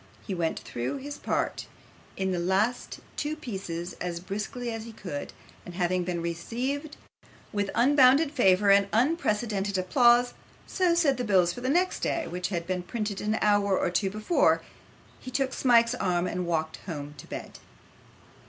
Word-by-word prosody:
He 200 Hz, -, -3 dB
went 170 Hz, -3 st, -1 dB
through 120 Hz, -, -4 dB
his 285 Hz, +2 st, -7 dB
part -, -, -2 dB, 0.5 s
in 190 Hz, 0 st, 0 dB
the 180 Hz, -, -1 dB
two -, -, -2 dB
last 200 Hz, +7 st, 0 dB, 0.4 s
pieces 185 Hz, -, -5 dB
as 175 Hz, -1 st, -3 dB
briskly 210 Hz, +6 st, -4 dB
as 225 Hz, -1 st, -5 dB
he 230 Hz, -, -9 dB
could, 160 Hz, -9 st, -6 dB, 0.3 s
and 175 Hz, -, -10 dB
having 180 Hz, 0 st, +1 dB
been 175 Hz, -1 st, -3 dB
received 255 Hz, -, -3 dB, 0.6 s
with 205 Hz, -1 st, -1 dB
unbounded 275 Hz, +3 st, +5 dB
favour 200 Hz, -7 st, +4 dB
and 200 Hz, 0 st, +5 dB
unprecedented 215 Hz, -, +1 dB
applause 240 Hz, +6 st, +4 dB, 0.3 s
so 360 Hz, -3 st, +1 dB
said 305 Hz, -6 st, +3 dB
the 250 Hz, -, -2 dB
bills 185 Hz, -5 st, +3 dB
for 245 Hz, -, -8 dB
next 340 Hz, +9 st, +1 dB
day, 335 Hz, -, -1 dB
which 180 Hz, 0 st, -3 dB
had 170 Hz, -4 st, -3 dB
been 185 Hz, 0 st, -2 dB
printed 210 Hz, +1 st, -4 dB
an 215 Hz, +1 st, 0 dB
hour 205 Hz, -2 st, +3 dB
or -, -, 0 dB
two 190 Hz, +2 st, +1 dB
before 215 Hz, -, +2 dB, 0.6 s
he 255 Hz, -, -8 dB
took 265 Hz, +1 st, -1 dB
Smike's 235 Hz, -2 st, +4 dB
arm 180 Hz, -7 st, 0 dB
and 180 Hz, -1 st, -3 dB
walked 160 Hz, -2 st, -1 dB
home 145 Hz, -4 st, -5 dB
to -, -, -11 dB
bed. -, -, -8 dB
205 Hz, 160 wpm, -27 LUFS, 180-250 Hz, 0.6 s, unbounded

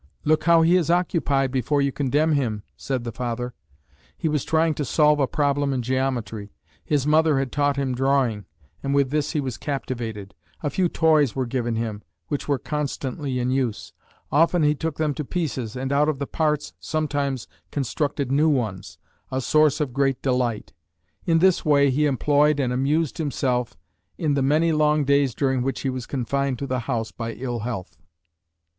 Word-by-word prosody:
"Look 155 Hz, +1 st, +2 dB
how 165 Hz, -1 st, +6 dB
he 170 Hz, +3 st, +5 dB
is 170 Hz, -3 st, 0 dB
occupied 155 Hz, -6 st, +1 dB
before 135 Hz, +3 st, 0 dB
you 140 Hz, 0 st, +2 dB
condemn 145 Hz, +4 st, +1 dB
him," 115 Hz, -8 st, 0 dB
said 130 Hz, -3 st, -3 dB
the 120 Hz, -, -4 dB
father. 125 Hz, +1 st, -4 dB, 0.6 s
He -, -, -1 dB
was 150 Hz, -3 st, 0 dB
trying 160 Hz, 0 st, +2 dB
to 150 Hz, -, -3 dB
solve 150 Hz, +1 st, +3 dB
a 135 Hz, -, +2 dB
problem 145 Hz, -1 st, 0 dB
in 125 Hz, -2 st, -1 dB
geometry. 120 Hz, -5 st, -2 dB, 0.3 s
His 145 Hz, -3 st, 0 dB
mother 155 Hz, -1 st, +4 dB
had 135 Hz, -2 st, -1 dB
taught 145 Hz, -1 st, +1 dB
him 135 Hz, -2 st, 0 dB
drawing, 130 Hz, -5 st, +1 dB, 0.4 s
and 140 Hz, 0 st, -1 dB
with 140 Hz, -2 st, +2 dB
this 150 Hz, +1 st, 0 dB
he 155 Hz, -, +1 dB
was 130 Hz, -4 st, -4 dB
captivated. 115 Hz, -8 st, -4 dB, 0.3 s
A 145 Hz, -, -1 dB
few 180 Hz, +4 st, +1 dB
toys 155 Hz, -7 st, +3 dB
were 130 Hz, -1 st, 0 dB
given 120 Hz, -1 st, -2 dB
him, 110 Hz, -2 st, -3 dB, 0.3 s
which 145 Hz, -, -3 dB
were 140 Hz, -2 st, +2 dB
constantly 140 Hz, -2 st, -3 dB
in 125 Hz, 0 st, 0 dB
use. 130 Hz, -5 st, -2 dB, 0.4 s
Often 165 Hz, +3 st, +3 dB
he 150 Hz, 0 st, +4 dB
took 160 Hz, +1 st, -4 dB
them 155 Hz, -2 st, 0 dB
to 150 Hz, -, -4 dB
pieces, 135 Hz, -, -3 dB
and 130 Hz, +2 st, -2 dB
out 150 Hz, +2 st, +3 dB
of 150 Hz, -, -1 dB
the 140 Hz, -, -3 dB
parts 150 Hz, 0 st, -1 dB
sometimes 145 Hz, -5 st, -2 dB, 0.2 s
constructed 140 Hz, 0 st, -2 dB
new 150 Hz, +3 st, +4 dB
ones, 105 Hz, -, -2 dB, 0.3 s
a 130 Hz, -, -1 dB
source 150 Hz, +2 st, +3 dB
of 145 Hz, -5 st, -2 dB
great 135 Hz, -1 st, +1 dB
delight. 125 Hz, -4 st, -1 dB, 0.5 s
In 165 Hz, -1 st, +4 dB
this 185 Hz, +1 st, +3 dB
way 140 Hz, -2 st, +4 dB
he 150 Hz, +3 st, +2 dB
employed 145 Hz, +2 st, +2 dB
and 125 Hz, -3 st, 0 dB
amused 145 Hz, +5 st, 0 dB
himself 130 Hz, -, -1 dB, 0.4 s
in 155 Hz, -4 st, 0 dB
the 140 Hz, -, +1 dB
many 155 Hz, +5 st, +3 dB
long 150 Hz, -1 st, +3 dB
days 140 Hz, -3 st, +2 dB
during 130 Hz, -2 st, +1 dB
which 135 Hz, +2 st, -2 dB
he 135 Hz, -, -1 dB
was 130 Hz, -2 st, -5 dB
confined 140 Hz, 0 st, -1 dB
to 140 Hz, -, -4 dB
the 130 Hz, -1 st, -1 dB
house 115 Hz, -3 st, -1 dB
by 115 Hz, -1 st, -5 dB
ill 120 Hz, -1 st, -4 dB
health. 105 Hz, -5 st, -5 dB
140 Hz, 185 wpm, -24 LUFS, 125-150 Hz, 0.6 s, how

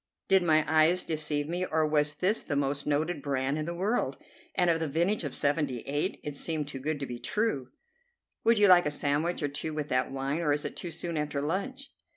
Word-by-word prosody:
Did 190 Hz, -1 st, +5 dB
my 155 Hz, -3 st, +3 dB
eyes 160 Hz, +4 st, +4 dB
deceive 150 Hz, -2 st, 0 dB
me, 175 Hz, +3 st, -2 dB
or 160 Hz, -3 st, +1 dB
was 150 Hz, -1 st, +1 dB
this 200 Hz, +5 st, +2 dB
the 145 Hz, -, -3 dB
most 140 Hz, 0 st, -1 dB
noted 150 Hz, +2 st, 0 dB
brand 135 Hz, +1 st, -1 dB
in 155 Hz, -, -2 dB
the 170 Hz, +1 st, -4 dB
world, 205 Hz, +7 st, -1 dB, 0.4 s
and 180 Hz, -, +3 dB
of 165 Hz, -1 st, +3 dB
the 160 Hz, -, -1 dB
vintage 170 Hz, +8 st, 0 dB
of 145 Hz, -, -4 dB
'78? 145 Hz, -1 st, -1 dB
It 145 Hz, -1 st, -5 dB
seemed 155 Hz, 0 st, -1 dB
too 140 Hz, -2 st, -6 dB
good 150 Hz, +2 st, -2 dB
to -, -, -1 dB
be 120 Hz, -2 st, -7 dB
true. 210 Hz, -, -1 dB, 0.7 s
"Would 230 Hz, 0 st, +4 dB
you 205 Hz, 0 st, +6 dB
like 180 Hz, -3 st, +6 dB
a -, -, +2 dB
sandwich 150 Hz, +3 st, 0 dB
or -, -, +2 dB
two 150 Hz, +2 st, -4 dB
with 150 Hz, -1 st, -3 dB
that 130 Hz, -1 st, +1 dB
wine, 135 Hz, +3 st, -2 dB
or 150 Hz, -4 st, +2 dB
is 145 Hz, -, -2 dB
it -, -, -5 dB
too 175 Hz, -, -5 dB
soon 170 Hz, 0 st, -3 dB
after 150 Hz, -1 st, -2 dB
lunch?" 200 Hz, -, -3 dB
155 Hz, 220 wpm, -29 LUFS, 145-175 Hz, 0.7 s, you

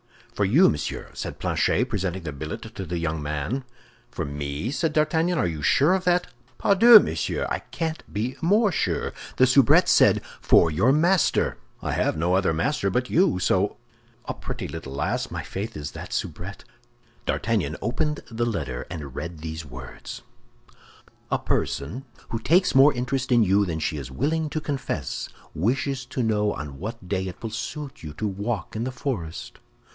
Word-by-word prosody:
"For 105 Hz, -, +1 dB
you, 140 Hz, -, +6 dB
monsieur," 75 Hz, -, -3 dB
said -, -, -5 dB
Planchet, -, -, +1 dB
presenting 95 Hz, -1 st, -2 dB
the 75 Hz, -, -4 dB
billet 75 Hz, +2 st, -6 dB
to 95 Hz, -, -5 dB
the 85 Hz, +1 st, -2 dB
young 80 Hz, -2 st, -2 dB
man. 75 Hz, -, -2 dB, 0.5 s
"For -, -, -4 dB
me?" 70 Hz, -, -3 dB
said 155 Hz, +1 st, 0 dB
D'Artagnan; 160 Hz, +3 st, +2 dB
"are -, -, +2 dB
you 80 Hz, -4 st, -3 dB
sure 145 Hz, -, +4 dB
of 190 Hz, 0 st, 0 dB
that?" 175 Hz, 0 st, +3 dB, 0.3 s
"Pardieu, 220 Hz, +4 st, +8 dB
monsieur, -, -, -1 dB
I -, -, 0 dB
can't 160 Hz, -2 st, -4 dB
be 115 Hz, +5 st, -2 dB
more 205 Hz, +5 st, +4 dB
sure. -, -, -1 dB, 0.2 s
The 130 Hz, -, +6 dB
soubrette 130 Hz, -1 st, +5 dB
said, -, -, +5 dB, 0.2 s
'For 85 Hz, -, +5 dB
your 100 Hz, +12 st, +3 dB
master.' 170 Hz, +5 st, +3 dB, 0.3 s
I -, -, -1 dB
have -, -, 0 dB
no 85 Hz, +3 st, +1 dB
other 95 Hz, -2 st, +3 dB
master 100 Hz, -, 0 dB
but 125 Hz, +6 st, -1 dB
you; 175 Hz, -, +4 dB
so—a 95 Hz, +2 st, -2 dB
pretty -, -, -5 dB
little 80 Hz, -5 st, -7 dB
lass, 70 Hz, -, -1 dB
my -, -, -4 dB
faith, 100 Hz, 0 st, -5 dB
is 75 Hz, -1 st, -5 dB
that -, -, -8 dB
soubrette!" 90 Hz, +5 st, -4 dB, 0.6 s
D'Artagnan -, -, 0 dB
opened 150 Hz, +7 st, -1 dB
the 115 Hz, +1 st, 0 dB
letter, 70 Hz, -, -3 dB
and 75 Hz, -7 st, -6 dB
read 85 Hz, +3 st, -6 dB
these 80 Hz, 0 st, -5 dB
words: 65 Hz, -3 st, -9 dB, 1.1 s
"A -, -, +2 dB
person 90 Hz, -, -2 dB, 0.2 s
who 115 Hz, -, -2 dB
takes 175 Hz, +11 st, +3 dB
more 135 Hz, +3 st, +7 dB
interest 125 Hz, +1 st, -2 dB
in 120 Hz, -2 st, +6 dB
you 100 Hz, 0 st, +3 dB
than 80 Hz, -2 st, -2 dB
she 80 Hz, -1 st, -2 dB
is 65 Hz, -3 st, -6 dB
willing 155 Hz, -, -1 dB
to 155 Hz, -, -2 dB
confess 135 Hz, -, -3 dB, 0.2 s
wishes 130 Hz, -, 0 dB
to 125 Hz, 0 st, -2 dB
know 105 Hz, -2 st, +1 dB
on 70 Hz, -3 st, -7 dB
what 110 Hz, -1 st, -6 dB
day 95 Hz, 0 st, -1 dB
it 90 Hz, -, -9 dB
will 115 Hz, -, -3 dB
suit 140 Hz, +5 st, -5 dB
you 75 Hz, -2 st, -7 dB
to 105 Hz, -, -2 dB
walk 100 Hz, 0 st, -3 dB
in 110 Hz, +2 st, -2 dB
the 130 Hz, -, -2 dB
forest? 110 Hz, -, -5 dB
105 Hz, 175 wpm, -25 LUFS, -, 1.1 s, Pardieu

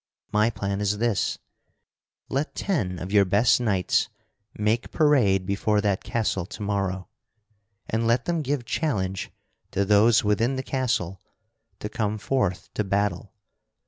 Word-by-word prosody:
My 105 Hz, +2 st, +3 dB
plan 100 Hz, -2 st, -3 dB
is 105 Hz, 0 st, 0 dB
this: 115 Hz, -2 st, 0 dB, 0.9 s
Let 140 Hz, +4 st, -2 dB
ten 105 Hz, -, -1 dB
of 90 Hz, +3 st, -6 dB
your 100 Hz, -1 st, +6 dB
best 100 Hz, +6 st, +3 dB
knights 100 Hz, -6 st, +1 dB, 0.5 s
make 110 Hz, +3 st, 0 dB
parade 120 Hz, -, +3 dB
before 105 Hz, +2 st, +1 dB
that 100 Hz, -2 st, 0 dB
castle 100 Hz, -6 st, -1 dB
tomorrow, 100 Hz, -3 st, -3 dB, 0.8 s
and 115 Hz, +1 st, 0 dB
let 115 Hz, +2 st, +2 dB
them 170 Hz, -2 st, 0 dB
give 140 Hz, -3 st, -2 dB
challenge 95 Hz, -, -1 dB, 0.4 s
to 100 Hz, -, 0 dB
those 105 Hz, +3 st, +5 dB
within 115 Hz, +5 st, +1 dB
the 130 Hz, -, -3 dB
castle 115 Hz, -10 st, -1 dB, 0.6 s
to -, -, -3 dB
come 110 Hz, -2 st, -2 dB
forth 105 Hz, -5 st, -1 dB
to 105 Hz, -, 0 dB
battle. 100 Hz, +1 st, -1 dB
105 Hz, 135 wpm, -25 LUFS, 100-120 Hz, 0.9 s, your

